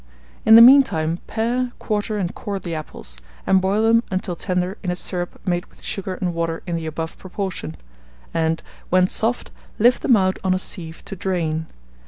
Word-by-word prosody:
In 220 - +10
the 230 - +11
mean 270 +4 +10
time 165 -9 -2
pare, 240 +3 0
quarter, 210 0 -2
and 185 -3 -2
core 200 -1 -4
the 175 -3 -5
apples, 150 - -6 0.3
and 190 -1 +4
boil 200 +3 +1
them 230 +1 +4
until 185 -2 -2
tender 180 +2 -2
in 185 - -3
a 180 - 0
syrup 175 -1 -4
made 175 0 -1
with - - -20
sugar 190 -1 -4
and 180 -1 -2
water 165 -1 -2
in 175 -2 -2
the 165 -1 -3
above 160 +1 -5
proportion; 185 - -5 0.6
and, 165 0 0 0.3
when 185 0 +5
soft, 225 +6 -1 0.3
lift 240 +3 +4
them 245 - +5
out 185 -1 +1
on 185 -1 +2
a - - +1
sieve 165 -3 -7
to 195 - -6
drain. 165 -4 -2
185 Hz, 190 wpm, -22 LUFS, 170-210 Hz, 0.6 s, the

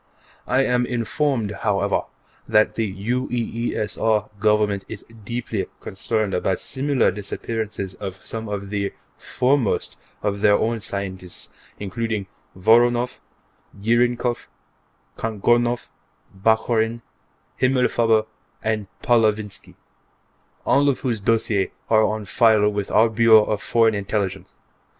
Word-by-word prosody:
I 130 +2 +3
am 125 -1 +1
informed, 120 -1 -1
however, 100 -1 +1 0.4
that 105 0 +3
the 110 -3 -1
UEESR 115 -1 -1
Government 105 -2 +2
is 110 - -8 0.2
deeply 115 -2 -3
concerned 105 +1 -2
about 90 +1 0
similar 140 -3 +1
disappearances 105 0 -4
of 95 -1 -7
some 110 -1 -5
of 100 -1 -5
the 100 -1 -2 0.3
foremost 130 -3 0 0.3
of 100 -1 -1
their 105 -1 +5
own 115 +2 0
scientists, 95 -4 -5 0.3
including 105 +1 -3 0.3
Voronoff, 120 +5 +3 0.6
Jirnikov, 120 +2 +1 0.7
Kagorinoff, 120 +2 +1 0.5
Bakhorin, 110 +2 +1 0.6
Himmelfarber 120 -4 +3 0.4
and 110 -2 -1 0.2
Pavlovinsky, 110 -3 +1 0.9
all 140 +1 +4
of 135 - -1
whose 120 -5 -1
dossiers 105 -2 +1 0.2
are 110 -1 +6
on 110 -1 -1
file 110 +1 +4
with 100 -1 -3
our 115 - +5
Bureau 110 -1 +6
of 105 -1 -2
Foreign 115 -1 +3
Intelligence. 100 -2 -3
110 Hz, 105 wpm, -22 LUFS, 100-120 Hz, 0.9 s, are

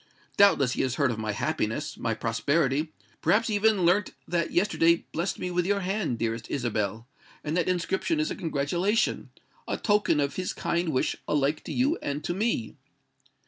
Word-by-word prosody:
Doubtless 145 -10 +5
he - - -1
has 130 -1 0
heard 140 -3 +2
of 110 - -4
my 110 -1 -2
happiness—my 115 +3 -2
prosperity: 140 +6 0 0.3
perhaps 225 +2 +3
he - - 0
even 205 -3 +3
learnt 185 +4 +2
that 170 -2 0
yesterday 170 -3 +2
blest 170 +4 -2
me 180 - -4
with 175 0 +1
your 200 0 +1
hand, 190 - -1
dearest 115 0 -3
Isabel; 110 -4 -2 0.4
and 155 +1 -2
that 175 -2 +1
inscription 190 - 0
is 310 - 0
a - - -2
congratulation—a 175 +7 -2
token 205 -7 +2
of 140 -1 -1
his 185 -1 -2
kind 170 0 -1
wish 130 -4 0
alike 150 +1 +1
to - - -5
you 280 +7 +1
and 145 +1 -3
to 175 - -1
me." 195 - -1
165 Hz, 170 wpm, -27 LUFS, 135-195 Hz, 0.4 s, Doubtless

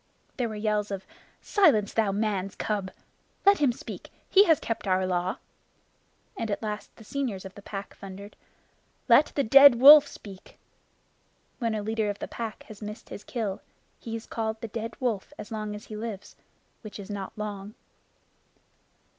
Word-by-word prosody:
There 245 -3 -1
were 215 - -6
yells 210 -1 -1
of 195 -1 -5 0.4
"Silence, 220 - +3
thou 220 -3 +2
man's 195 -2 -2
cub!" 205 -3 -2 0.6
"Let 400 0 +6
him 285 -4 +4
speak. 235 - -9 0.2
He 400 +1 +6
has 325 -5 +4
kept 225 -2 -4
our 185 0 +2
Law"; 180 0 -1 1.0
and 225 - -4
at 205 - -3
last 210 -1 -5
the 225 - -14
seniors 220 -6 -3
of 190 - -9
the 205 - -12
Pack 200 0 -7
thundered: 200 +1 -10 0.7
"Let 265 +4 +6
the 280 - +2
Dead 275 +2 +8
Wolf 285 +4 +9
speak." 195 -8 -12 1.0
When 230 -3 -1
a 210 - -3
leader 220 0 -1
of 205 - -3
the - - -6
Pack 225 -2 -6
has 215 -1 -13
missed 210 +2 -8
his 205 - -8
kill, 215 -6 -4 0.4
he 225 -1 -6
is 225 - -7
called 220 -1 -3
the 230 - -5
Dead 225 +1 -5
Wolf 230 -7 -2
as - - -9
long 215 -1 -4
as 210 - -10
he 215 - -8
lives, 215 -2 -7 0.5
which 215 - -9
is 200 0 -8
not 200 0 -6
long. 210 -1 -6
215 Hz, 170 wpm, -27 LUFS, 200-230 Hz, 1.0 s, Wolf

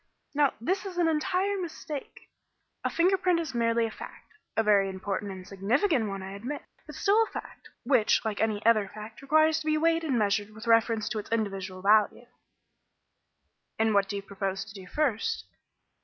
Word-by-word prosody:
Now, 290 -1 +2
this 370 - -1
is 380 -3 -7
an 345 -2 +3
entire 375 +5 0
mistake. 310 -4 -7 0.6
A - - +1
finger 365 +3 +3
print 360 -2 +2
is 320 -5 -4
merely 230 -1 +2
a 225 - -4
fact 445 - -11 0.2
a 225 - +4
very 200 -2 +4
important 195 +1 -4
and 185 -1 -9
significant 225 - +1
one, 195 -1 -5
I 190 - -7
admit 245 +9 -5 0.2
but - - -9
still 420 +2 +3
a 450 - +2
fact, - - -9
which, 245 -4 +3
like 215 -2 -2
any 215 -1 0
other 215 -3 +4
fact, 215 +4 -10
requires 310 +3 +3
to 310 - -7
be 310 0 +3
weighed 330 +1 +2
and 275 -6 0
measured 210 0 0
with 220 - -9
reference 230 -1 +3
to 220 - -2
its 210 - -9
evidential 195 -4 -2
value." 210 +3 +3 1.5
"And 220 0 +2
what 200 -1 +3
do 205 - -3
you 200 - -4
propose 195 -1 -3
to - - -12
do 190 -3 -10
first?" 250 -3 -1
225 Hz, 185 wpm, -28 LUFS, 205-310 Hz, 1.5 s, a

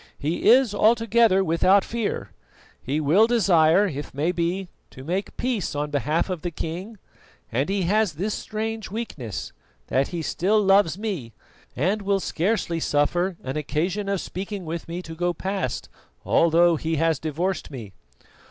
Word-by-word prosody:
He 160 +8 0
is 245 -2 +5
altogether 225 -2 +4
without 185 +3 +3
fear; 230 -2 -3 0.5
he 140 +4 -1
will 165 +9 +4
desire, 190 -5 +4
if 145 -7 -5
may 155 +5 +1
be, 180 +2 -2 0.2
to 130 - -12
make 185 +7 -3
peace 240 -11 -2
on 145 +1 -2
behalf 150 +3 0
of 180 -4 -4
the 175 - -2
king; 175 +7 -6 0.5
and 135 +8 0
he 195 -1 0
has 205 0 +2
this 195 +8 -2
strange 220 0 -4
weakness, 185 - -5 0.4
that 135 +1 +2
he 170 -2 -4
still 200 +7 +1
loves 195 -4 +4
me, 185 - -4 0.4
and 190 - 0
will 200 0 +1
scarcely 175 -2 -1
suffer 170 +5 +1
an 130 +3 -3
occasion 175 +7 -2
of 200 -1 0
speaking 195 0 -6
with 165 +1 -5
me 175 +2 -5
to 165 - -8
go 175 +1 -1
past, 190 - -3 0.4
although 170 0 +4
he 160 +2 -2
has 160 -1 +1
divorced 165 +4 -2
me." 115 -8 -9
175 Hz, 155 wpm, -24 LUFS, 155-200 Hz, 0.5 s, is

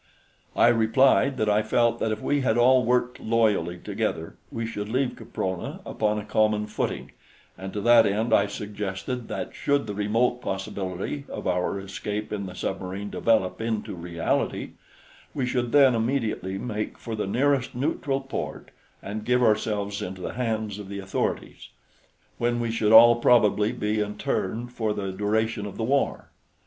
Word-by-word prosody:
I - - +5
replied 130 +4 +3
that 110 - 0
I 105 0 +3
felt 115 +2 +1
that 110 - 0
if 110 - -2
we 145 -1 +1
had 120 -3 +1
all 125 +1 +5
worked 125 +1 +1
loyally 105 -7 +1
together 80 -1 -3 0.2
we 115 0 -3
should 105 -2 -5
leave 130 +2 0
Caprona 95 -2 -4
upon 105 -1 0
a 105 - -5
common 105 -1 +2
footing, - - -3 0.4
and 95 0 -7
to 105 - -4
that 120 0 +6
end 110 +4 0
I 100 - +4
suggested 105 +4 -5
that - - -5
should 140 -2 0
the 105 - -4
remote 115 +5 +1
possibility 95 +6 -4
of - - -6
our 90 +2 0
escape 105 +2 -5
in 100 -2 -3
the 90 - -9
submarine 95 +2 -4
develop 100 -4 +1
into 110 -2 -2
reality, 85 -1 -2 0.6
we 135 - 0
should 125 -1 -1
then 140 -3 +6
immediately 115 -5 -1
make 105 0 -4
for 115 - -5
the 105 - -2
nearest 130 +3 +1
neutral 135 +1 -1
port 135 0 -6 0.3
and 105 +1 -5
give 125 +2 +2
ourselves 105 -2 +1
into 95 0 -6
the - - -4
hands 110 -4 -2
of 100 -2 -8
the 100 - -5
authorities, 95 -1 -3 0.7
when 120 0 +1
we 115 -1 -1
should 110 -2 +1
all 115 +1 +9
probably 110 -3 +4
be 105 +1 -1
interned 105 +2 -2
for 110 -3 -1
the 95 -2 -3
duration 105 +2 -1
of 100 - -9
the 115 - -2
war. 135 +4 0
110 Hz, 165 wpm, -25 LUFS, 100-120 Hz, 0.7 s, all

